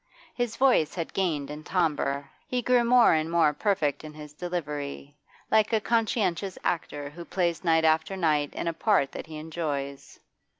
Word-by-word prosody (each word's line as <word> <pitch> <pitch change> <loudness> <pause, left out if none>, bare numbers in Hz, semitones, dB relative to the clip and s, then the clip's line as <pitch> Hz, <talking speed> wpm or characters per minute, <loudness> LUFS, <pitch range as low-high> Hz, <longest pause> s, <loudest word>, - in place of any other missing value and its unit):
His 245 -2 -2
voice 255 - +3
had 170 -3 -4
gained 155 -7 -1
in 150 +1 -8
timbre; 145 -5 0 0.2
he 250 -1 -1
grew 250 0 +4
more 240 -3 +6
and 155 0 0
more 165 -3 +3
perfect 155 -6 0
in 155 -1 -9
his 150 -1 -10
delivery, 150 -4 -5 0.4
like 220 0 +4
a 220 - +4
conscientious 205 -5 0
actor 145 -4 -2
who 170 +3 -9
plays 170 -2 -1
night 160 -2 +3
after 160 +4 +2
night 150 -5 +1
in - - -3
a 170 - 0
part 165 -6 +2
that - - -7
he 155 -1 -8
enjoys. 150 -3 -5
165 Hz, 170 wpm, -27 LUFS, 150-195 Hz, 0.4 s, more